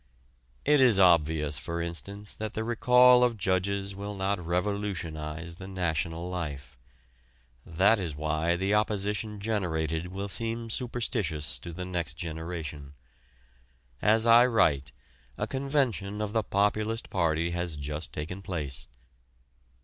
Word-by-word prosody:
It 150 -1 +5
is 120 -6 +6
obvious, 80 -5 +3
for 85 0 -4
instance, 100 +5 -5
that 110 -1 -5
the 110 - -1
recall 125 +2 +6
of 120 -2 +2
judges 100 +1 0
will 100 +1 -6
not 95 -1 -1
revolutionize 85 -3 -3
the 95 - -8
national 85 -2 -2
life. 75 -8 -5 0.9
That 95 +6 +4
is 85 -6 -4
why 80 +3 0
the 95 +3 0
opposition 105 0 0
generated 85 -6 -1
will 100 +1 -4
seem 115 +2 -1
superstitious 110 - -2
to 85 - -8
the 90 +2 -6
next 85 -5 -3
generation. 80 -3 -6 1.1
As 110 +2 +4
I 120 +1 +7
write, 75 - +2 0.5
a - - -1
convention 130 -7 -1
of 105 -1 -3
the 110 - +3
Populist 105 +3 0
Party 85 -2 +1
has 85 -2 -2
just 75 +2 -5
taken 85 +6 -5
place. 75 -9 -4
95 Hz, 125 wpm, -28 LUFS, 80-105 Hz, 1.1 s, I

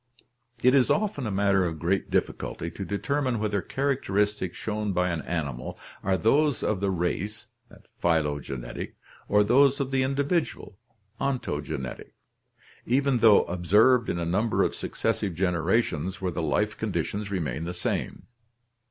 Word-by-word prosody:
— 120 -1 -26
It 125 +1 +6
is 135 -3 +4
often 200 - 0
a - - -2
matter 100 -1 +3
of 85 -3 -2
great 90 +5 0
difficulty 85 +1 -2
to 100 - -6
determine 130 +5 -1
whether 105 -2 0
characteristics 105 -9 -1
shown 105 -2 -2
by 90 0 +1
an 85 -2 -2
animal 70 -6 -4 0.2
are 95 0 +1
those 145 +5 +2
of 110 - 0
the 100 0 0
race 95 +4 -2 0.5
(phylogenetic) 75 -7 -2 0.3
or 105 0 +4
those 140 +6 +4
of 135 -1 -2
the 135 -1 +2
individual 140 - -1 0.4
(ontogenetic), 75 - -3 0.7
even 135 +1 +2
though 110 -3 +7
observed 105 +9 +3
in - - -1
a 85 - -2
number 100 +7 +1
of - - 0
successive 95 -5 -2
generations 90 0 0
where 95 -2 -2
the 85 - -3
life 75 -3 0
conditions 105 0 -2
remain 85 -4 -2
the 85 - -3
same. 85 - -3
100 Hz, 145 wpm, -27 LUFS, 85-125 Hz, 0.7 s, though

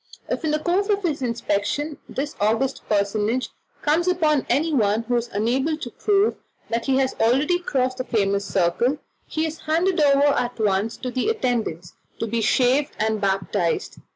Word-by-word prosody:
If - - -3
in 315 - 0
the 305 - +2
course 360 +6 0
of 405 -1 +1
his 305 -5 -1
inspection 240 +5 -1
this 290 +3 -4
august 225 +6 +1
personage 210 +4 0 0.3
comes 320 +4 +2
upon 310 -6 +2
anyone 240 -7 +2
who 245 +2 -1
is 240 0 -1
unable 260 +9 0
to 250 -6 -7
prove 410 - +1 0.3
that 230 +2 -1
he 265 -1 +3
has 265 -1 +1
already 275 +10 +3
crossed 255 -6 -1
the - - 0
famous 200 -5 0
circle, 200 +9 +1 0.3
he 315 +1 -1
is 315 0 -5
handed 335 +2 +1
over 280 -1 +5
at 245 0 -2
once 210 0 0
to 255 - -5
the 255 - 0
attendants, 230 - -2 0.2
to - - -2
be 230 +1 -1
"shaved 260 +6 +2
and 220 0 0
baptized." 190 -3 -1
255 Hz, 170 wpm, -23 LUFS, 220-305 Hz, 0.3 s, over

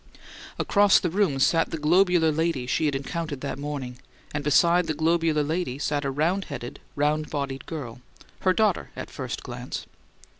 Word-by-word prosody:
Across 205 -1 +5
the 175 - -1
room 185 -8 +1
sat 165 +4 +3
the 165 - -3
globular 170 +1 +4
lady 160 -4 0
she 140 +5 0
had 145 - 0
encountered 145 0 -4
that 140 -1 -4
morning, 140 -4 -5 0.3
and 145 -1 -2
beside 170 +4 +4
the 155 - -1
globular 160 -1 +2
lady 155 -3 -2
sat 145 0 -1
a - - +1
round 165 +8 0
headed, 125 -5 -7 0.2
round 150 +1 +1
bodied 140 -2 -4
girl; 125 -7 -6 0.4
her 185 - +3
daughter, 215 +3 +1
at - - -7
first - - -5
glance. - - -6
155 Hz, 165 wpm, -26 LUFS, 140-170 Hz, 0.4 s, Across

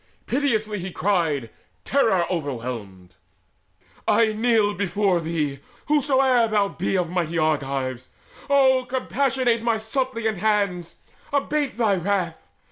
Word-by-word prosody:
Piteously 215 -8 -1
cried 170 -8 0
he, 115 - -12 0.4
terror 220 -10 +2
overwhelmed: 115 - -5 0.9
"I 220 -2 +3
kneel 220 -2 +2
before 195 -1 +1
thee, 155 -4 -2 0.3
whosoe'er 265 -5 +3
thou 205 -2 +1
be 195 - -1
Of 175 -2 -1
mighty 170 -2 -1
Argives. 135 -5 -1 0.4
Oh 265 -2 +4
compassionate 260 -2 0
My 230 -1 +1
suppliant 225 -1 -2
hands! 200 -4 0 0.4
Abate 285 -1 -1
thy 215 -5 +2
wrath! 180 -2 -2
205 Hz, 110 wpm, -23 LUFS, 165-240 Hz, 0.9 s, Oh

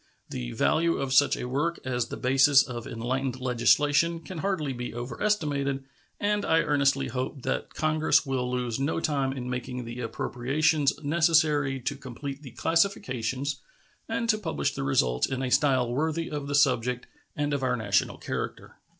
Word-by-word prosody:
The - - -4
value 165 +1 +2
of 135 -1 -2
such 145 +2 +5
a 125 - -4
work 150 +7 -1
as 125 -2 -1
the - - -6
basis 135 +2 +5
of 120 -2 -6
enlightened 130 +3 -2
legislation 145 +6 +3
can 170 0 -8
hardly 155 -7 -1
be 125 -1 -6
overestimated, 140 - -1 0.4
and 205 0 +1
I 160 0 +3
earnestly 140 -2 +1
hope 130 +2 -4
that - - -3
Congress 155 0 +2
will 130 -2 -1
lose 125 -1 -2
no 140 +4 0
time 140 -5 0
in 130 -2 -5
making 125 0 -4
the 120 +1 -7
appropriations 140 +6 +1
necessary 150 -3 +2
to 140 +4 -2
complete 135 +1 -7
the 140 - -9
classifications 140 - -1 0.5
and 230 +1 -1
to 215 -1 +3
publish 160 -7 -1
the 135 - -4
results 125 - +2
in 130 0 -3
a 125 - -2
style 130 -5 +3
worthy 160 +4 -1
of 145 -2 -4
the 145 - -1
subject 125 -3 +2 0.3
and 145 0 -1
of 140 - -1
our 125 -1 +1
national 100 -5 0
character. - - -5
135 Hz, 165 wpm, -27 LUFS, 125-155 Hz, 0.5 s, such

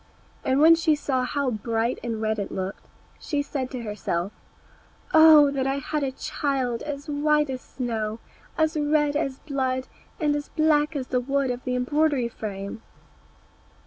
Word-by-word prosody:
And 260 +1 +2
when 325 +2 +8
she 325 -2 +3
saw 260 -3 -1
how 280 0 -1
bright 230 +2 -1
and 230 -2 -3
red 220 0 0
it 200 - -4
looked, 190 0 -5 0.3
she 290 -2 -2
said 270 -3 -3
to 250 -3 -6
herself, 195 -3 -2 0.8
"Oh 315 -2 +8
that 270 -1 -1
I 270 - +1
had 300 +2 -2
a 275 -2 -1
child 260 -3 -2
as 285 -1 -6
white 300 -1 +2
as 255 -1 -5
snow, 225 -4 -3 0.4
as 315 0 +2
red 295 -1 +2
as 275 -3 -1
blood, 260 -3 -2 0.3
and 300 -3 +2
as 290 0 -4
black 310 -1 +2
as 260 -3 -3
the 250 - +1
wood 275 0 0
of 245 0 -6
the 250 -1 -1
embroidery 275 0 +1
frame!" 200 -1 -6
270 Hz, 165 wpm, -25 LUFS, 240-295 Hz, 0.8 s, when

